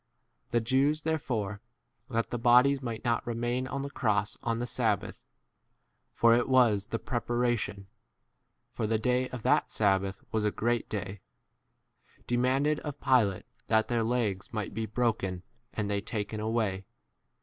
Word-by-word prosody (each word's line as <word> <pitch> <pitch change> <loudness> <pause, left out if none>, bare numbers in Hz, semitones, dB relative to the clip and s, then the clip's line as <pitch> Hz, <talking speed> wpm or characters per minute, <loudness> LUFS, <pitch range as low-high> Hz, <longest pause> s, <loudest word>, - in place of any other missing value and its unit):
The 120 - +1
Jews 135 +6 +2
therefore, 115 -10 -2 0.5
that 115 0 -1
the 120 - -2
bodies 125 +4 +5
might 115 -3 -5
not 120 0 0
remain 120 +2 -1
on 140 +1 -3
the 140 - -4
cross 105 -5 0
on 115 -1 -1
the 120 - -2
sabbath, 110 -4 -1 0.9
for 115 0 +4
it 120 +2 +2
was 115 -6 +4
[the] 115 - -2
prepara 120 0 0
tion, 100 -3 -5 0.9
(for - - -7
s - - -2
the 110 - +2
day 125 +3 +1
of 125 -3 -7
that - - +2
sabbath 95 -2 +1
was 110 -1 0
a 105 - +3
great 120 +3 -1
[day].) 100 -2 -4 1.0
demanded 130 +5 +1
of 145 -1 -6
Pilate 120 -8 +2 0.2
that 110 -1 +2
their 120 -1 +1
legs 115 -1 -1
might 110 -3 -4
be 110 +1 -3
32 105 - -23
broken 100 -7 0 0.3
and 105 -2 -2
they 100 0 -1
taken 105 0 -4
away. 110 -3 -1
115 Hz, 160 wpm, -29 LUFS, 105-125 Hz, 1.0 s, bodies